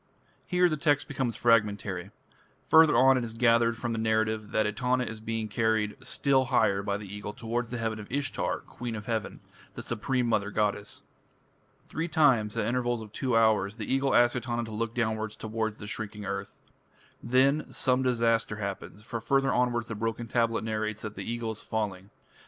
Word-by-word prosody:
Here 180 0 +4
the 155 -3 -1
text 145 -1 +2
becomes 130 -6 -2
fragmentary. 105 -5 +1 0.6
Further 160 -6 +7
on 130 +1 +6
it - - -3
is 115 -1 -5
gathered 115 0 +3
from 120 0 -3
the 115 - -2
narrative 110 -1 0
that 110 - +1
Etana 125 +4 0
is 110 -2 -6
being 110 0 -3
carried 110 -1 0
still 135 -2 +2
higher 100 -5 +2
by 100 0 -1
the 105 - -8
Eagle 105 +1 -6
towards 115 +2 -3
the 120 - -4
heaven 110 -1 -2
of 105 - -10
Ishtar, 140 +1 -1
"Queen 120 -2 -6
of 105 -1 -7
Heaven", 110 -2 -3 0.3
the - - -6
supreme 125 +2 -1
mother 105 -3 +1
goddess. 105 0 -2 0.8
Three 165 +2 -3
times, 135 -10 +3
at - - +1
intervals 120 -1 0
of 105 - -12
two 125 0 0
hours, 105 -3 +3
the 110 +1 -3
Eagle 135 0 +2
asks 120 +1 +5
Etana 120 -1 -2
to 110 - -7
look 115 +1 -3
downwards 110 -2 -1
towards 110 0 -3
the 105 - -9
shrinking 105 0 -5
earth. 100 0 -5 0.6
Then 135 +5 +2
some 130 0 +1
disaster 115 -3 +1
happens, 100 0 -6
for 115 0 -5
further 135 +4 +2
onwards 120 -1 +1
the 115 - -6
broken 115 +2 -3
tablet 115 -1 +1
narrates 110 -1 -2
that 105 -1 -5
the - - -5
Eagle 115 -1 -2
is 110 - -7
falling. 100 -3 -3
115 Hz, 185 wpm, -28 LUFS, 105-125 Hz, 0.8 s, Further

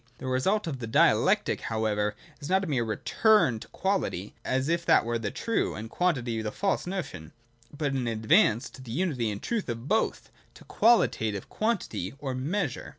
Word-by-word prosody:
The - - -9
result 130 +12 +1
of 145 -6 -4
the 115 - -5
dialectic 110 - +3
however 105 -2 -1 0.2
is 145 - -7
not 190 +1 +3
a - - -3
mere 130 -6 +1
return 125 - +2
to - - -11
quality, 190 - -2
as 130 +1 0
if 170 +1 0
that - - +5
were 115 0 -1
the 105 -2 -2
true 230 - -1
and 110 +1 -7
quantity 125 -11 0
the 105 -1 -3
false 195 - -1
notion, 95 - -5 0.4
but 145 -1 -2
an 130 -3 -1
advance 115 - +3
to 130 - -12
the 130 - -11
unity 135 -8 0
and 100 -1 -4
truth 225 - -2
of 115 +2 -5
both, 220 +7 0 0.2
to - - -14
qualitative 110 - +2
quantity, 215 - -2
or 140 -2 -4
Measure. 145 +4 -2
130 Hz, 180 wpm, -28 LUFS, 110-185 Hz, 0.4 s, that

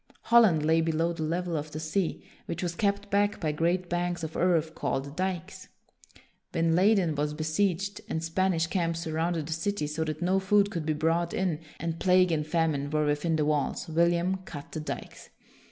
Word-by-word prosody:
Holland 220 -10 +5
lay 160 +1 +4
below 165 +1 0
the 165 - -7
level 170 +2 -1
of 155 0 -3
the 155 - -6
sea, 160 +3 -2 0.2
which 170 +2 -4
was 175 -1 -1
kept 200 +2 -1
back 205 +1 +2
by 155 -3 0
great 175 +4 0
banks 175 0 -2
of 160 0 -5
earth 165 -3 +2
called 140 0 -3
dikes. 185 -2 -4 0.9
When 165 0 +2
Leyden 190 -3 +4
was 150 +1 -2
besieged, 185 +5 -1
and 160 - -2
Spanish 165 0 +1
camps 170 -2 -1
surrounded 165 0 -1
the 160 - -3
city 165 +1 -1
so 150 +2 -2
that 155 -1 -4
no 185 +2 +2
food 200 +1 +3
could 165 -6 -4
be 155 - +2
brought 165 +3 0
in, 180 -5 0 0.2
and 165 0 -3
plague 185 -1 +4
and 150 -2 0
famine 155 -4 0
were 150 0 +1
within 150 +3 +1
the 155 -1 +1
walls, 150 +3 0
William 170 +3 +2
cut 160 -6 -10
the 155 - -4
dikes. 155 - -7
165 Hz, 185 wpm, -28 LUFS, 155-185 Hz, 0.9 s, Holland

